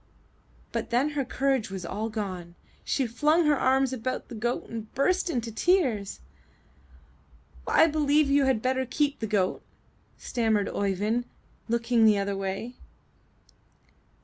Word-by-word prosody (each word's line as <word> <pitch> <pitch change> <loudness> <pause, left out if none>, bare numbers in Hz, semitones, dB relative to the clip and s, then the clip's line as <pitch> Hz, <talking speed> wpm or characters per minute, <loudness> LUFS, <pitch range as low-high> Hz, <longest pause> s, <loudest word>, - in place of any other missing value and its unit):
But - - -3
then 250 +5 +2
her 290 -2 -1
courage 260 -3 0
was 190 -2 -6
all 215 +6 -3
gone; 185 -6 -5 0.3
she 270 - 0
flung 300 +8 +2
her 300 -1 +4
arms 265 0 +2
about 255 +1 -4
the - - -8
goat 240 +2 -2
and 225 -1 -7
burst 360 +7 +1
into 240 -7 -2
tears. 235 - +1 1.5
''I - - +5
believe 300 -1 +3
you 275 0 +3
had 260 -5 +1
better 260 0 0
keep 285 +2 0
the 220 - -3
goat," 200 -3 0 0.6
stam 225 -3 0
mered 205 -1 -1
Oeyvind, 205 +5 0 0.4
looking 235 0 +2
the 215 -2 +5
other 200 0 -1
way. 195 +5 -4
240 Hz, 140 wpm, -27 LUFS, 210-275 Hz, 1.5 s, I